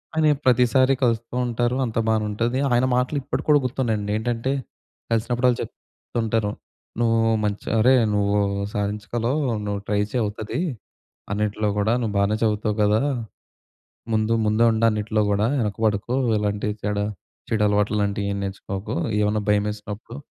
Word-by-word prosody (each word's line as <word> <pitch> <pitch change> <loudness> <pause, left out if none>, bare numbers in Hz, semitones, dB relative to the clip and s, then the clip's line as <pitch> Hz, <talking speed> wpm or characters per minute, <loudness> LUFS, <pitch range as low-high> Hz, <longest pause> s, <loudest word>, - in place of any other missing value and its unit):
ఆయన 160 -1 +3 0.2
ప్రతిసారి 130 +1 +4
కలుస్తూ 115 0 0
ఉంటారు, 120 +1 0
అంత 115 - -5
బాగానే 110 -1 +2
ఉంటుంది. 115 +5 -1
ఆయన 120 +1 +3
మాటలు 125 +4 0
ఇప్పటికి - - -4
కూడా 150 -1 +6
గుర్తున్నాయండి 115 -5 -1
ఏంటంటే 120 +3 -1 0.6
కలిసినప్పుడల్లా 120 +2 +2
చెప్తుంటారు. 115 -2 -3 0.5
"నువ్వు 115 -1 +3 0.2
మంచిగా 105 +2 -1
అరే! 125 +4 +5 0.2
నువ్వు 100 0 +2 0.4
సాధించగలవు, 105 +6 -1 0.3
నువ్వు 100 -1 -2
ట్రై 105 -1 +1
చెయ్ 125 - 0
అవుతది. 105 +4 -3 0.7
అన్నిట్లో 105 0 -1
కూడా 110 +3 +2
నువ్వు 110 -3 -2
బానే 100 +2 +2
చదువుతావు 105 -1 0
కదా! 105 +1 +3 1.1
ముందు 110 0 +1
ముందే 110 +2 +3
ఉండు 110 +1 +1
అన్నిట్లో 110 0 -1
కూడా 100 +1 +2
వెనకపడకు. 110 0 0 0.2
ఎలాంటి 105 0 -1
చెడు, 105 0 0 0.4
చెడు 110 -2 0
అలవాట్లు 105 +1 +1
లాంటివి 100 0 -1
ఏం 100 - -3
నేర్చుకోకు. 95 0 -5 0.3
ఏమన్నా 105 +1 +1
భయమేసినప్పుడు 105 +2 -2
110 Hz, 135 wpm, -23 LUFS, 105-120 Hz, 1.1 s, కూడా